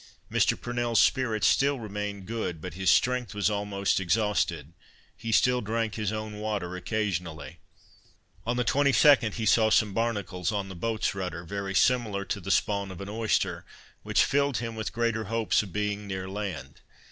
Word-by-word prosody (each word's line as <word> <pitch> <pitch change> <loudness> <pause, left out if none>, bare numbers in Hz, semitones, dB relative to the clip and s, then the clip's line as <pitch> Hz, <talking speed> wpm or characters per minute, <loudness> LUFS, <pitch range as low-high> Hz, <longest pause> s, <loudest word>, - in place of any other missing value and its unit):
Mr. - - +2
Purnell's 120 -1 0
spirits 115 -6 +2
still 140 0 +3
remained 105 -3 -5
good, 110 -6 -3
but 90 +1 -7
his 95 +1 0
strength 125 +2 +2
was 105 +1 +1
almost 100 -2 0
exhausted; 90 -5 0 0.4
he 115 - -5
still 125 +2 +3
drank 115 0 -2
his 105 -3 -2
own 110 -1 -5
water 105 -4 -3
occasionally. 90 -7 -3 0.8
On 120 +2 -1
the 125 - +1
22d 140 -4 +4
he 110 - -2
saw 110 +1 +4
some 110 -2 +3
barnacles 100 -5 -1
on 100 -2 -3
the 95 - -8
boat's 110 +5 -1
rudder, 90 -3 -4
very 100 +2 -4
similar 110 -6 +2
to - - -3
the - - -7
spawn 100 -2 +1
of 95 - -9
an 100 0 -6
oyster, 110 +1 0 0.4
which - - +2
filled 140 -2 +1
him 115 -1 -4
with 110 -1 -4
greater 115 -2 -1
hopes 115 +1 +1
of 100 -4 -9
being 105 0 -2
near 95 -1 -4
land. 95 -9 -6
105 Hz, 170 wpm, -27 LUFS, 95-115 Hz, 0.8 s, 22d